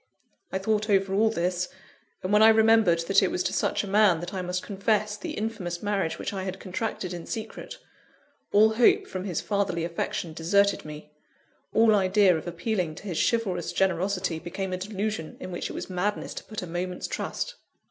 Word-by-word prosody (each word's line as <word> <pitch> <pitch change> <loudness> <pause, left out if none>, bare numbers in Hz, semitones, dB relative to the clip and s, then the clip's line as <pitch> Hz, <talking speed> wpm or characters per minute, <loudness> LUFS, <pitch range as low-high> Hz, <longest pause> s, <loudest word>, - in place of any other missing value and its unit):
I - - 0
thought 215 +2 0
over 195 -1 +2
all 220 +3 +4
this, 180 -3 -1 0.5
and 185 +2 -1
when 210 - +6
I 220 - +9
remembered 220 -6 +5
that 195 +4 +3
it 190 - +2
was 180 - -1
to - - -1
such - - 0
a - - -5
man 200 -4 +4
that 175 +2 -6
I 190 - -2
must 180 0 -3
confess 210 +1 0
the - - -6
infamous 210 -6 -4
marriage 200 -5 0
which - - -4
I 195 - -3
had 190 0 -5
contracted 185 -1 -4
in 175 -1 -7
secret, 225 -2 -6 0.7
all 215 +2 +6
hope 235 +1 +4
from 185 0 -5
his 180 -5 -2
fatherly 200 -5 -1
affection 170 -1 -3
deserted 200 +5 +2
me; 150 0 -9 0.6
all 225 0 +5
idea 195 -1 +4
of 160 - -5
appealing 175 -1 -2
to - - -11
his 185 -6 -3
chivalrous 185 -8 -1
generosity 185 -1 0
became 185 +3 -4
a - - -1
delusion 200 -3 -4
in 185 - -7
which 175 - -4
it - - -6
was - - -5
madness 190 +3 -2
to - - -7
put 215 -3 -6
a - - -4
moment's 180 +1 -4
trust. - - -3
190 Hz, 195 wpm, -27 LUFS, 175-210 Hz, 0.7 s, I